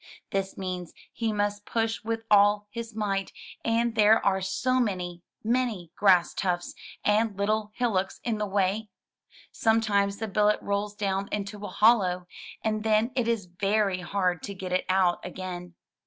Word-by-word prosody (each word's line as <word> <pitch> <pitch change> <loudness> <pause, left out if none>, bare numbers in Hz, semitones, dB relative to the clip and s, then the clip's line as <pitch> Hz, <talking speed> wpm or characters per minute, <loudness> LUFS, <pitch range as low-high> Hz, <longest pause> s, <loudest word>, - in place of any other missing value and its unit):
This 195 0 -2
means 180 -2 -5 0.2
he 225 -2 -1
must 205 0 -1
push 225 0 -1
with 225 0 -2
all 205 0 +5
his 230 -1 -6
might, 195 -3 -1 0.3
and 230 +1 +1
there 220 0 +5
are 190 -1 +2
so 255 +7 0
many, 180 -6 -2 0.2
many 225 -7 0
grass 185 -4 +4
tufts 175 -2 -2 0.3
and 210 0 +2
little 210 +1 0
hillocks 195 -6 0
in 225 -3 -1
the 210 - -1
way! 200 +2 0 0.6
Some 225 0 +3
times 200 -2 +1
the 220 - -3
billet 210 +1 +2
rolls 205 +1 -2
down 200 -1 -1
into 205 0 -4
a - - -3
hollow, 190 -5 +3 0.4
and 215 -1 0
then 220 +2 +2
it 245 -3 +1
is 230 -5 0
very 195 +2 0
hard 180 -2 -1
to 200 - -6
get 185 -1 -6
it 185 - +1
out 185 -2 +2
again. 180 -1 -7
205 Hz, 160 wpm, -27 LUFS, 190-220 Hz, 0.6 s, all